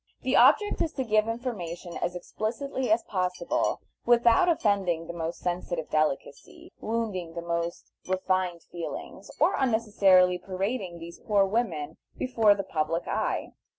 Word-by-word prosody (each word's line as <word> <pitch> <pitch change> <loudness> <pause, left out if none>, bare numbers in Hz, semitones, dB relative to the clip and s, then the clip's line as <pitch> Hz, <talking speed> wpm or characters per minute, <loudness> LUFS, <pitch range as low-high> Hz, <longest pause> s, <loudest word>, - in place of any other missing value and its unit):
The - - +1
object 415 -1 +5
is 320 - -1
to 265 - -2
give 215 -2 +2
information 190 -8 -5
as 175 +1 -2
explicitly 240 +8 -3
as 225 +2 +3
possible 180 -3 -1 0.2
without 240 +9 +5
offending 195 - +1
the 170 - -6
most 165 0 -4
sensitive 175 -2 -3
delicacy, 155 -3 -2
wounding 210 -7 -3
the 170 - -4
most 170 0 -3 0.2
refined 185 -2 0
feelings, 170 -1 -7
or - - +4
unnecessarily 200 -7 +4
parading 190 0 -3
these 170 0 -10
poor 205 -3 +2
women 185 -8 -2 0.2
before 225 -5 +3
the 195 - -3
public 165 -1 -2
eye. - - -2
185 Hz, 135 wpm, -27 LUFS, 170-225 Hz, 0.2 s, object